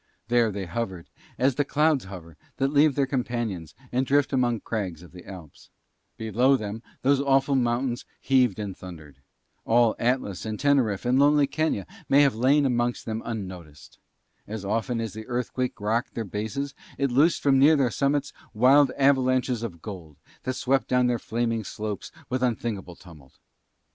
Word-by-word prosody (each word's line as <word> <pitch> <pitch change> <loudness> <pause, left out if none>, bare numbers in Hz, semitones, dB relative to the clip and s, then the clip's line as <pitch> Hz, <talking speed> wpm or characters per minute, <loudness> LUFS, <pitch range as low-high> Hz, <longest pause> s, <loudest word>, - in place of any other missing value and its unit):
There 120 -2 +3
they 100 -1 -4
hovered 95 -2 -5 0.3
as 130 +1 +2
the 145 - +1
clouds 150 -2 +1
hover 85 -4 -10 0.2
that 135 +1 0
leave 145 -1 +4
their 140 - +2
companions 120 - -3 0.2
and 130 +1 +1
drift 140 +1 +1
among 120 -4 +1
crags 95 -7 -4
of 90 - -14
the 90 -1 -13
Alps: 90 -7 -12 0.5
below 120 +5 +2
them 110 0 -6 0.2
those 140 +1 +3
awful 135 0 +2
mountains 120 -1 0 0.2
heaved 125 -6 +2
and 100 -3 -5
thundered. 80 -7 -11 0.5
All 115 -1 +3
Atlas, 120 -6 -1
and 110 -1 -4
Teneriffe, 130 -8 +2
and 125 +2 +3
lonely 145 0 +5
Kenia 155 - -1 0.2
might 140 +1 +6
have 140 -2 +4
lain 135 +6 +3
amongst 120 -1 0
them 110 0 -3
unnoticed. 90 - -8 0.5
As 105 -1 -6
often 115 +4 -1
as 115 -3 -4
the 110 0 -8
earthquake 125 +1 -2
rocked 110 +3 -1
their 115 - -3
bases 110 +8 -4 0.2
it 140 -2 0
loosened 150 +7 +3
from 135 -2 +4
near 150 +4 +6
their 135 -5 +2
summits 140 +3 0 0.2
wild 135 +5 +5
avalanches 130 -3 +2
of 90 -9 -6
gold 85 -9 -9 0.3
that 130 0 -1
swept 135 +1 +1
down 125 0 +2
their 120 -1 +1
flaming 115 0 -2
slopes 105 0 -5 0.2
with 130 0 -2
unthinkable 110 -7 -2
tumult. 80 -7 -16
120 Hz, 165 wpm, -26 LUFS, 105-135 Hz, 0.5 s, might